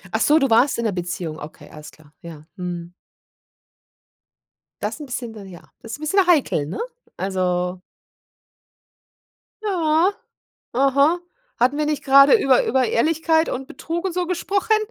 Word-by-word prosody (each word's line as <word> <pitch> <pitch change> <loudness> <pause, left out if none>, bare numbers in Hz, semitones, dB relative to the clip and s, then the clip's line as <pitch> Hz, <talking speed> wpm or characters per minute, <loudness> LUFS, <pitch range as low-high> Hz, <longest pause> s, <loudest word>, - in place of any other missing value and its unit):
Ach 220 - 0
so, 300 +2 +5
du 275 -3 +2
warst 245 +4 +4
in 235 - -2
'ner 215 - +1
Beziehung, 175 -3 -5
okay, 150 - -11
alles 150 0 -11
klar, 150 -1 -21
ja. 155 -3 -11
Mhm. 175 -2 -6 1.9
Das - - -3
'n 295 - -7
bisschen 245 -3 -6
dann 200 -3 -10
ja, 175 -2 -12 0.2
das 225 0 -9
ist - - -6
bisschen 365 +5 +2
heikel, 285 - +2
ne? 155 - -6 0.4
Also 180 -1 -1 1.9
Ja, 340 -1 +2 0.6
aha. 280 +6 +3 0.4
Hatten 255 +4 +2
wir 300 - 0
nicht 300 -2 -2
gerade 275 - +7
über 265 -8 +3
über 260 0 +2
Ehrlichkeit 320 +6 +1
und 265 +1 -5
Betrug 340 +6 -5
und 365 - -2
so 360 -1 -1
gesprochen? 395 +4 0
265 Hz, 150 wpm, -21 LUFS, -, 1.9 s, gerade